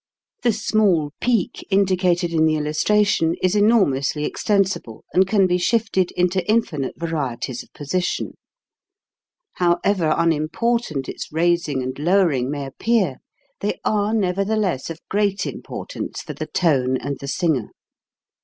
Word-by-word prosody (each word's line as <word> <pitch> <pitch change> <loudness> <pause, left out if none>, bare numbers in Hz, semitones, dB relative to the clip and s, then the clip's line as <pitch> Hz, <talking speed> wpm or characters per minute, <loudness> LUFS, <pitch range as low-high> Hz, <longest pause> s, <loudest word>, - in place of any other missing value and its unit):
The 240 - +3
small 205 -8 +1
peak 235 -7 0
indicated 185 -3 +2
in 160 -1 +3
the 155 - +2
illustra 155 +8 +2
tion 165 -4 +1
is 185 +2 +1
enormously 160 - +2
extensible 195 - -1
and 190 +1 +4
can 195 -1 +3
be 180 0 +1
shifted 200 -2 +1
into 180 +1 +1
infinite 170 - 0
varieties 135 -7 -3
of - - -17
position. 175 +5 -2 1.2
However 175 -1 +2
unimportant 165 - 0
its - - -6
raising 160 -4 +1
and 130 +2 -5
lowering 160 -6 +2
may 145 -1 -3
appear, 190 - 0 0.4
they - - -2
are 210 0 +1
nevertheless 195 -5 0
of 165 -1 -9
great 200 -1 0
impor - - -5
tance - - -6
for - - -6
the - - -5
tone 130 -7 +1
and 140 0 -5
the 140 - -7
singer. 140 -5 0
175 Hz, 135 wpm, -21 LUFS, 150-200 Hz, 1.2 s, and